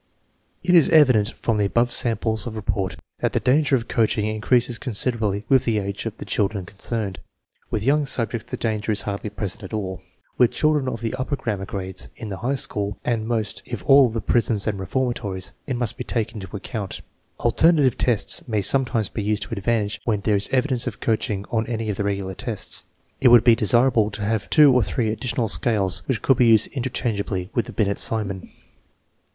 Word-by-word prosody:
It 180 - +2
is 170 -4 +6
evident 130 -9 +5
from 115 -2 -2
the 100 - +2
above 120 +4 +1
samples 110 -2 -1
of 110 - -6
report 95 -3 -2 0.2
that - - -1
the - - +2
danger 140 +2 +3
of 120 -2 -2
coaching 110 -2 +1
increases 115 +3 0
considerably 110 -3 -1
with 130 -2 +4
the 115 -4 0
age 100 +2 -3
of 110 0 -7
the - - -8
children 100 -2 -1
concerned. 100 +1 -4 0.5
With 105 - -2
young 145 +3 +2
subjects 115 -3 -2
the - - -4
danger 110 -1 -2
is 105 - +2
hardly 100 +1 -4
present 100 0 -5
at 95 - -9
all; 95 -3 -4 0.4
with 125 -2 +6
children 150 -3 +1
of 115 - -5
the 115 -1 -3
upper 140 +3 -1
grammar 105 -7 -4
grades, 95 -2 -5
in 110 - -7
the 95 - -5
high 130 +6 -1
school, 105 -5 -2
and 115 -2 -1
most 110 -3 -2
of 110 -7 -4
all 135 +1 +6
in 115 0 -3
prisons 110 -1 +1
and 105 -3 -2
reformatories, 100 -2 -3
it 130 - -1
must 120 -3 -1
be - - -2
taken 115 -1 -3
into 95 +1 -9
account. 100 -1 -6 0.4
Alternative 150 -7 +3
tests 120 0 0
may 105 -4 -1
sometimes 120 -1 +1
be 110 - -5
used 105 0 -1
to 95 - -10
advantage 105 +1 -1
when 105 -4 0
there 105 +1 +1
is 100 0 0
evidence 130 -2 +1
of - - -5
coaching 105 -3 -1
on 110 -1 0
any 115 -2 -2
of 100 - -6
the - - -1
regular 100 -1 -2
tests. 90 - -5 0.3
It 135 - +4
would 120 -2 +7
be 120 - +6
desirable 115 0 +3
to 105 0 -5
have 110 0 -1
two 150 -3 +6
or 125 - +4
three 110 +2 -1
additional 120 +1 -2
scales 100 -5 +4
which 120 -5 -1
could 135 - +3
be 125 - +4
used 110 -2 +5
interchangeably 110 -7 -2
with 120 - 0
the - - -7
Binet 100 -2 0
Simon. 100 -4 0
110 Hz, 200 wpm, -22 LUFS, 100-120 Hz, 0.5 s, would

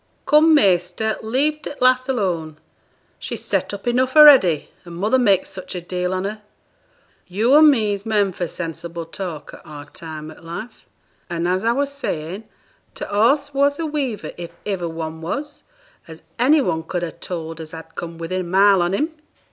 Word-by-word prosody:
'Come, 310 +1 +5
measter, 190 - +2
leave 280 +7 0
t' - - -6
lass 255 +1 +3
alone; 175 - -1 0.6
she's - - -6
set - - -1
up 200 -1 -7
enough 255 +2 +1
a'ready, 270 - +7
her 175 - -12
mother 205 +9 +1
makes 200 -6 +3
such 185 0 -8
a - - -2
deal 180 +1 -3
on 185 0 -2
her. 210 +2 -5 0.9
Yo' 220 +9 +2
an' 310 0 +8
me's 210 -7 +1
men 210 -3 +1
for 175 -1 -4
sensible 165 0 -6
talk 165 -3 -7
at - - -12
our 145 -1 -10
time 155 0 -9
o' - - -15
life. 170 +8 -9 0.4
An', 170 -1 -2
as 185 +2 0
I 230 +1 +2
was 280 +2 -1
saying, 190 - -5 0.5
t' - - -5
horse 275 +8 +2
was 285 +1 +2
a 330 - -2
weaver 280 -8 -3
if 170 -1 -7 0.2
iver 185 -5 -2
one 160 0 -6
was, 285 - -5 0.5
as 160 -1 -12 0.2
any 285 +5 +5
one 160 -10 -1
could 175 +2 -4
ha' 170 - -5
told 165 -2 -6
as 160 - -9
had 160 0 -10
come 170 -1 -7
within 170 +3 -3
a - - -4
mile 190 +2 +4
on 175 +2 +1
him.' 310 +9 -1
190 Hz, 180 wpm, -21 LUFS, 170-255 Hz, 0.9 s, an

